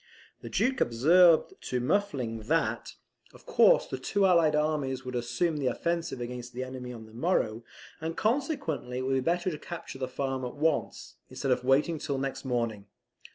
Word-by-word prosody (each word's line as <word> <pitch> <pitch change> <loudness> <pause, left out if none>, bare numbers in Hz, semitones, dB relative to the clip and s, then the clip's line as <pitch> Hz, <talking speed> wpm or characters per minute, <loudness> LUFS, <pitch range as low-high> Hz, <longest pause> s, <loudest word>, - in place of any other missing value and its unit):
The - - -7
Duke 265 +1 +1
observed 165 - +5 0.2
to 125 - 0
Muffling, 130 - -1
that - - 0 0.4
of - - -17
course - - +5
the 130 - -5
two 195 +9 +1
Allied 170 -5 +4
armies 145 -4 -1
would 125 - -5
assume 140 +7 -1
the 140 -3 -1
offensive 170 +2 -1
against 120 0 -6
the 125 +2 -3
enemy 130 -1 -7
on 115 -2 -9
the 110 - -16
morrow; 115 -5 0 0.4
and 165 +1 -4
consequently, 220 - -1
it - - -1
would 135 +1 0
be 135 - +2
better 175 +6 0
to 150 - -6
capture 170 -6 -8
the 130 - -2
farm 135 0 -3
at 125 - -5
once, 155 0 -1
instead 135 - -2
of 125 0 +1
waiting 145 +5 +2
till 140 -2 -2
next 135 0 -3
morning. 115 -5 -2
135 Hz, 180 wpm, -29 LUFS, 125-165 Hz, 0.4 s, observed